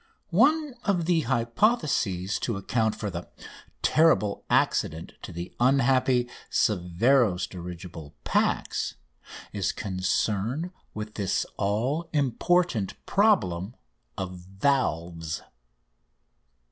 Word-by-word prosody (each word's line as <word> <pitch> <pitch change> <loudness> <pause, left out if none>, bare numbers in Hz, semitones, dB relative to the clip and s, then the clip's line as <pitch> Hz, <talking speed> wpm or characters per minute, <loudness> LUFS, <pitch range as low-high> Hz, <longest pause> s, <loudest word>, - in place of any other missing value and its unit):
One 295 - +3
of 180 -5 +1
the 170 -1 +3
hypotheses 120 - +1
to 115 -5 -2
account 110 +2 0
for 105 -2 -4
the 85 0 -6 0.5
terrible 155 -11 +3
accident 80 +1 +1
to - - -8
the 85 +1 -6
unhappy 130 -1 +3 0.2
Severo's 100 +2 +2
dirigible 85 -4 -9
"Pax"[A] - - 0 0.6
is 100 - +1
concerned 105 - -1 0.2
with 105 0 -5
this 100 -3 0
all 125 +12 -1
important 145 - +1
problem 120 - +2 0.4
of 90 -1 -5
valves. 90 - -1
110 Hz, 90 wpm, -27 LUFS, 90-140 Hz, 0.6 s, One